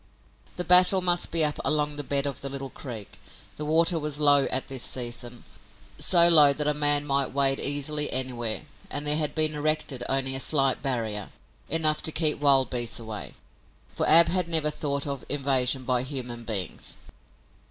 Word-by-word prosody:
The 180 Hz, -, -3 dB
battle 180 Hz, +2 st, +6 dB
must 175 Hz, -1 st, +2 dB
be 165 Hz, -2 st, +3 dB
up 150 Hz, -, -2 dB
along 150 Hz, 0 st, +1 dB
the 145 Hz, -, -5 dB
bed 140 Hz, 0 st, -2 dB
of 140 Hz, -3 st, -5 dB
the 140 Hz, -, -4 dB
little 135 Hz, -1 st, -6 dB
creek. 115 Hz, -6 st, -10 dB, 0.4 s
The 150 Hz, -, -5 dB
water 165 Hz, +2 st, +2 dB
was 150 Hz, -1 st, -1 dB
low 145 Hz, -2 st, +4 dB
at 130 Hz, +1 st, -1 dB
this 135 Hz, -2 st, -5 dB
season, 120 Hz, -1 st, -3 dB, 0.6 s
so 170 Hz, -2 st, +5 dB
low 150 Hz, -4 st, +6 dB
that 150 Hz, +1 st, -3 dB
a 150 Hz, -, +1 dB
man 145 Hz, 0 st, +2 dB
might 140 Hz, -2 st, -1 dB
wade 135 Hz, -1 st, +1 dB
easily 145 Hz, +1 st, 0 dB
anywhere, 125 Hz, -2 st, -3 dB, 0.3 s
and 145 Hz, -, -4 dB
there 150 Hz, 0 st, +1 dB
had 150 Hz, -2 st, -3 dB
been 155 Hz, -1 st, +2 dB
erected 150 Hz, -3 st, -2 dB
only 135 Hz, 0 st, -1 dB
a 135 Hz, -, 0 dB
slight 135 Hz, -2 st, +1 dB
barrier, 115 Hz, -7 st, -4 dB, 0.4 s
enough 155 Hz, -1 st, +2 dB
to 160 Hz, -, +1 dB
keep 155 Hz, -2 st, +1 dB
wild 140 Hz, -3 st, +3 dB
beasts 120 Hz, -2 st, -2 dB
away, 110 Hz, -3 st, -9 dB, 0.5 s
for -, -, -4 dB
Ab 170 Hz, +1 st, +6 dB
had 180 Hz, -1 st, 0 dB
never 155 Hz, -2 st, +1 dB
thought 140 Hz, -2 st, -3 dB
of 140 Hz, -3 st, -6 dB
invasion 135 Hz, -2 st, 0 dB
by 125 Hz, 0 st, -1 dB
human 125 Hz, -3 st, -5 dB
beings. 100 Hz, -7 st, -4 dB
140 Hz, 180 wpm, -25 LUFS, 130-150 Hz, 0.6 s, battle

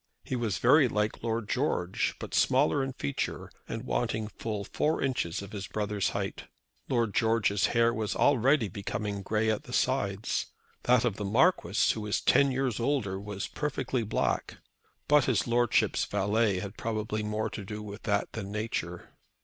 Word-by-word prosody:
He -, -, -3 dB
was 115 Hz, -6 st, -1 dB
very 135 Hz, +3 st, +5 dB
like 105 Hz, -2 st, -1 dB
Lord 115 Hz, -2 st, -2 dB
George, 110 Hz, -9 st, 0 dB
but -, -, -7 dB
smaller 80 Hz, -, +3 dB
in 135 Hz, 0 st, -3 dB
feature, 70 Hz, -, -3 dB, 0.2 s
and -, -, -4 dB
wanting 105 Hz, -, -1 dB
full 105 Hz, -2 st, -4 dB
four 155 Hz, +10 st, 0 dB
inches 100 Hz, -9 st, -1 dB
of 100 Hz, -, -10 dB
his 100 Hz, -2 st, -5 dB
brother's 105 Hz, -2 st, -1 dB
height. -, -, -4 dB, 0.4 s
Lord 115 Hz, -5 st, +1 dB
George's 110 Hz, -4 st, +2 dB
hair 115 Hz, 0 st, +4 dB
was 110 Hz, -3 st, -2 dB
already 135 Hz, -2 st, +3 dB
becoming 100 Hz, +1 st, -4 dB
grey 110 Hz, +2 st, +1 dB
at 110 Hz, -, -3 dB
the 125 Hz, -, -9 dB
sides. 105 Hz, -7 st, 0 dB, 0.4 s
That 125 Hz, 0 st, +4 dB
of 110 Hz, -4 st, 0 dB
the 105 Hz, -, -3 dB
Marquis, 110 Hz, -, +3 dB
who 110 Hz, -, -5 dB
was 105 Hz, -1 st, 0 dB
ten 140 Hz, -1 st, +4 dB
years 130 Hz, -3 st, -1 dB
older, 115 Hz, -7 st, 0 dB
was 100 Hz, -1 st, -5 dB
perfectly 135 Hz, -4 st, -2 dB
black; 110 Hz, -, -1 dB, 0.5 s
but 145 Hz, -3 st, +5 dB
his 125 Hz, -7 st, +1 dB
Lordship's 120 Hz, -1 st, +2 dB
valet 105 Hz, 0 st, +1 dB
had 100 Hz, +2 st, -7 dB
probably 110 Hz, -1 st, -2 dB
more 105 Hz, +1 st, -2 dB
to 105 Hz, -, -6 dB
do 105 Hz, +2 st, -6 dB
with 105 Hz, +1 st, -8 dB
that 100 Hz, -2 st, 0 dB
than 100 Hz, -3 st, -6 dB
nature. 105 Hz, -5 st, -4 dB
110 Hz, 165 wpm, -29 LUFS, 100-120 Hz, 0.5 s, very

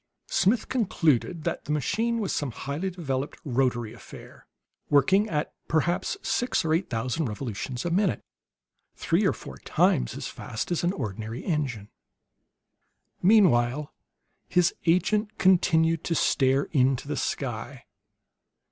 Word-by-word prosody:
Smith 215 Hz, +6 st, +2 dB
concluded 165 Hz, -, +1 dB
that -, -, -3 dB
the 150 Hz, -, -4 dB
machine 225 Hz, -, 0 dB
was 205 Hz, -4 st, -2 dB
some 145 Hz, -, -1 dB
highly 140 Hz, +10 st, -4 dB
developed 145 Hz, -6 st, -3 dB
rotary 120 Hz, -4 st, 0 dB
affair, 115 Hz, -, -13 dB, 0.4 s
working 190 Hz, +10 st, +4 dB
at 150 Hz, -2 st, -2 dB
perhaps 175 Hz, +3 st, 0 dB
six 245 Hz, -8 st, 0 dB
or 160 Hz, -, +2 dB
eight 170 Hz, +4 st, 0 dB
thousand 125 Hz, +6 st, -1 dB
revolutions 120 Hz, +3 st, -5 dB
a 175 Hz, -, -1 dB
minute 190 Hz, +1 st, +1 dB, 0.7 s
three -, -, +1 dB
or -, -, +3 dB
four -, -, -9 dB
times -, -, +1 dB
as -, -, -5 dB
fast 110 Hz, -, -5 dB
as 175 Hz, -, 0 dB
an 175 Hz, -, +2 dB
ordinary 110 Hz, -, -5 dB
engine. 135 Hz, -, -2 dB, 1.3 s
Meanwhile 150 Hz, -, +4 dB, 0.6 s
his 180 Hz, -1 st, +3 dB
agent 210 Hz, +5 st, +2 dB
continued 165 Hz, -3 st, +3 dB
to 165 Hz, -, 0 dB
stare 135 Hz, -2 st, +2 dB
into 130 Hz, -3 st, +2 dB
the -, -, -2 dB
sky. -, -, -4 dB
150 Hz, 130 wpm, -26 LUFS, 130-180 Hz, 1.3 s, working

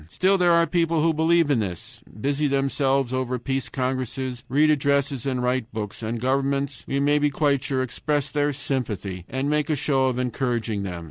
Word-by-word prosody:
Still 190 Hz, -, +2 dB
there 180 Hz, -2 st, +4 dB
are 170 Hz, 0 st, +5 dB
people 165 Hz, -2 st, +1 dB
who 165 Hz, 0 st, +3 dB
believe 160 Hz, 0 st, +3 dB
in 130 Hz, -, +3 dB
this, 90 Hz, -5 st, -5 dB, 0.2 s
busy 145 Hz, +5 st, 0 dB
themselves 135 Hz, -1 st, +1 dB
over 130 Hz, -1 st, -1 dB
peace 135 Hz, +2 st, -3 dB
congresses, 130 Hz, -1 st, -3 dB
read 150 Hz, +4 st, +4 dB
addresses, 140 Hz, -2 st, +1 dB
and 130 Hz, -2 st, -1 dB
write 125 Hz, -1 st, -1 dB
books. 110 Hz, -1 st, -5 dB
And 115 Hz, +1 st, -3 dB
governments, 135 Hz, +1 st, -1 dB
we 140 Hz, -, 0 dB
may 145 Hz, +1 st, +3 dB
be 145 Hz, 0 st, +2 dB
quite 140 Hz, -1 st, +1 dB
sure, 130 Hz, -2 st, 0 dB
express 145 Hz, +2 st, -2 dB
their 145 Hz, 0 st, +1 dB
sympathy 110 Hz, -10 st, -3 dB
and 130 Hz, +2 st, -2 dB
make 150 Hz, +1 st, 0 dB
a 155 Hz, -, +2 dB
show 135 Hz, -1 st, +1 dB
of 125 Hz, -1 st, -1 dB
encouraging 120 Hz, -4 st, -1 dB
them. 90 Hz, -3 st, -4 dB
135 Hz, 190 wpm, -24 LUFS, 125-145 Hz, 0.2 s, are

